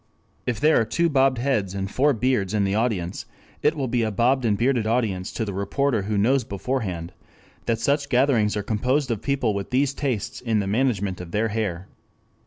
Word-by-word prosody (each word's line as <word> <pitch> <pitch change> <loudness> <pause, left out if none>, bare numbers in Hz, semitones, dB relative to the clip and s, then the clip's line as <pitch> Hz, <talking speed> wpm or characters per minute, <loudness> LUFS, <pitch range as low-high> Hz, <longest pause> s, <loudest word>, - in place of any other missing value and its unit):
If 120 -3 -1
there 150 -4 +4
are - - +3
two 170 +9 +1
bobbed 135 -3 +3
heads 115 -7 0
and 95 0 -2
four 145 +3 +3
beards 110 -5 0
in 105 - +2
the 95 0 0
audience, 105 -5 -1 0.3
it 150 +2 +2
will 135 -3 -2
be 120 0 0
a 110 - +1
bobbed 120 +5 +2
and 105 -3 +2
bearded 120 -2 +1
audience 110 -6 0
to 115 - -2
the 100 - -4
reporter 110 +5 0
who 105 +1 -2
knows 125 +6 +3
beforehand 95 -6 -3 0.5
that 115 -1 +2
such 140 +5 0
gatherings 120 -6 +2
are 105 - -2
composed 125 +6 0
of 110 - -2
people 135 -6 0
with 100 -1 -4
these 135 +2 +1
tastes 130 -8 -3
in 115 -3 0
the 100 - 0
management 100 -4 0
of 90 - -8
their 110 +5 0
hair. 100 -4 -3
115 Hz, 200 wpm, -24 LUFS, 100-130 Hz, 0.5 s, there